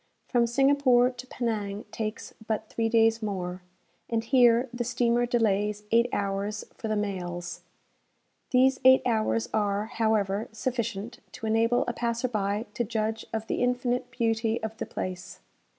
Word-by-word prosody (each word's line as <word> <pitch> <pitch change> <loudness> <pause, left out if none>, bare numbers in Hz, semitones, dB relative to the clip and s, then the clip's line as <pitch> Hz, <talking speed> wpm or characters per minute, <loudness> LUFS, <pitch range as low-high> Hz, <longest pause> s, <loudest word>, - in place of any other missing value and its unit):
From 240 -2 +2
Singapore 260 -1 +4
to 250 0 -10
Penang 215 -5 -3
takes 215 -1 -5
but 220 0 -2
three 225 -1 -1
days 225 0 +3
more, 185 -3 -3 0.5
and 225 -1 0
here 240 0 +4
the 240 0 -2
steamer 240 0 +1
delays 210 -3 +1
eight 235 +1 +4
hours 200 +1 -2
for 225 - -6
the 215 - 0
mails. 175 -4 -4 0.9
These 260 +1 +4
eight 260 0 +7
hours 225 -1 +1
are, 205 -1 +1
however, 220 -3 0
sufficient 235 -1 -3
to 225 - -7
enable 230 +3 +2
a 240 - -1
passer 235 +1 -1
by 210 -1 -1
to 240 - -1
judge 220 0 -2
of 220 0 -3
the - - -2
infinite 250 0 0
beauty 225 -1 0
of 220 0 -4
the - - -4
place. 180 -1 -6
225 Hz, 150 wpm, -27 LUFS, 210-240 Hz, 0.9 s, eight